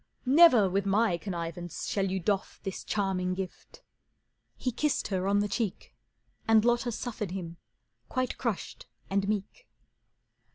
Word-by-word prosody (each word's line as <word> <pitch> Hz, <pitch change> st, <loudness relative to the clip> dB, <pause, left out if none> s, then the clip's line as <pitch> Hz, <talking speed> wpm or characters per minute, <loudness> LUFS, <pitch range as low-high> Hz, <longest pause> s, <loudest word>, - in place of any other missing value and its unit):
"Never 260 Hz, -, +7 dB
with 195 Hz, +2 st, 0 dB
my 205 Hz, -1 st, +3 dB
connivance 175 Hz, -2 st, -5 dB
shall 195 Hz, -1 st, 0 dB
you 190 Hz, +1 st, -1 dB
doff 195 Hz, +2 st, -1 dB
This 195 Hz, -, -5 dB
charming 185 Hz, -3 st, -1 dB
gift." 190 Hz, -1 st, -7 dB, 0.7 s
He 255 Hz, -, -1 dB
kissed 295 Hz, +5 st, 0 dB
her 190 Hz, -1 st, -1 dB
on 200 Hz, +1 st, +3 dB
the 205 Hz, -, 0 dB
cheek, 210 Hz, -1 st, -3 dB, 0.5 s
And 225 Hz, 0 st, +5 dB
Lotta 240 Hz, 0 st, +2 dB
suffered 215 Hz, -3 st, -4 dB
him, 170 Hz, -2 st, -6 dB, 0.5 s
quite 255 Hz, -1 st, -2 dB
crushed 230 Hz, -6 st, -3 dB, 0.2 s
and 195 Hz, 0 st, +1 dB
meek. 215 Hz, -, -3 dB
200 Hz, 135 wpm, -29 LUFS, 185-230 Hz, 0.7 s, Never